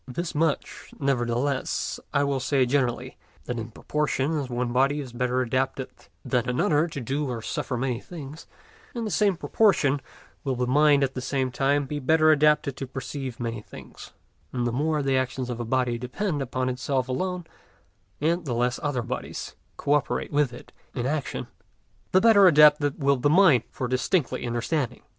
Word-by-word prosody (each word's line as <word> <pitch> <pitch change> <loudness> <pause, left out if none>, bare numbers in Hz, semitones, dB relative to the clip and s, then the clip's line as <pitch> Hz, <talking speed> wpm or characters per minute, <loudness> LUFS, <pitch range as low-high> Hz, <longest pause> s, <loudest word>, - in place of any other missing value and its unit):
This 160 +7 -4
much, 155 -1 -1
nevertheless, 130 0 -1
I 140 - +2
will 140 -1 0
say 130 +1 +2
generally, 125 -2 -1 0.3
that 120 -1 -3
in 115 +1 -5
proportion 150 +4 -1
as 135 -3 -4
one 120 0 -2
body 135 +3 +2
is 130 -4 -7
better 125 +1 0
adapted 130 +2 -1 0.3
than 125 -1 0
another 145 +5 +2
to 150 - -6
do 135 +3 -2
or 115 -3 -4
suffer 125 - -3
many 125 -1 -1
things, 155 0 -10 0.5
in 235 -1 -2
the 215 - -3
same 200 -3 +2
proportion 155 -10 +2 0.4
will 135 -2 -1
the 125 0 0
mind 145 +2 +4
at 135 -1 0
the 130 - -4
same 130 0 -1
time 140 +3 +1
be 145 +2 -4
better 155 +3 +4
adapted 150 -2 +3
to 135 - -5
perceive 135 -1 -6
many 115 -2 -3
things, - - -12 0.4
and 120 -2 -1
the 120 - 0
more 150 +4 0
the 135 -1 +2
actions 130 -1 -2
of 120 - -5
a 120 - -3
body 125 0 0
depend 145 - -2
upon 130 0 -2
itself 130 +1 -1
alone, 180 +6 -2 0.7
and 165 +4 0
the 125 -4 -2
less 120 +1 0
other 140 -5 -1
bodies 125 +2 -5 0.2
coöperate 145 -2 0
with 145 -3 +2
it 120 - -12 0.2
in 120 - -2
action, 145 +1 -2 0.7
the 185 - +5
better 205 -3 +7
adapted 150 -3 +5
will 140 0 +4
the 125 +4 +2
mind 160 - +6
be - - -31
for 130 - -3
distinctly 130 0 0
understanding. 120 +2 -2
135 Hz, 175 wpm, -26 LUFS, 125-150 Hz, 0.7 s, better